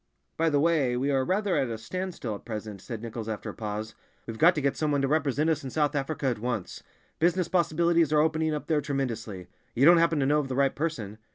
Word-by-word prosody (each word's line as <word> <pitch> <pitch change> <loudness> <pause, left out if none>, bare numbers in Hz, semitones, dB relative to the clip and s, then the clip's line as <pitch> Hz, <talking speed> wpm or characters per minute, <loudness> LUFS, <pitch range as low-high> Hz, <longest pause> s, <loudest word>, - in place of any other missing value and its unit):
"By 165 0 +2
the 145 -2 +2
way, 145 -6 +2
we 135 +3 0
are 135 -1 +2
rather 195 +4 0
at 130 - +1
a 115 - -4
standstill 170 - -5
at 100 - -8
present," 105 -3 -6
said 115 +1 -7
Nichols 115 -1 -5
after 110 - -4
a - - -14
pause. 110 0 -5 0.3
"We've 115 -1 -7
got 175 +3 +6
to 150 - -1
get 140 -1 +1
some 155 -1 -1
one 140 -1 +1
to - - +2
represent 150 0 +1
us 155 -1 -1
in 135 - -5
South 150 +2 0
Africa 145 +1 -3
at 125 -4 0
once—business 155 - -3
possibilities 170 -2 +2
are 150 - +4
opening 160 0 +1
up 150 - -5
there 155 -2 +1
tremendously. 115 - -4 0.3
You 130 - +4
don't 170 +2 +8
happen 165 -2 +3
to 135 - +2
know 150 +2 +3
of 145 - -2
the 130 - -4
right 135 0 +2
person?" 115 -10 -4
140 Hz, 240 wpm, -27 LUFS, 115-160 Hz, 0.3 s, don't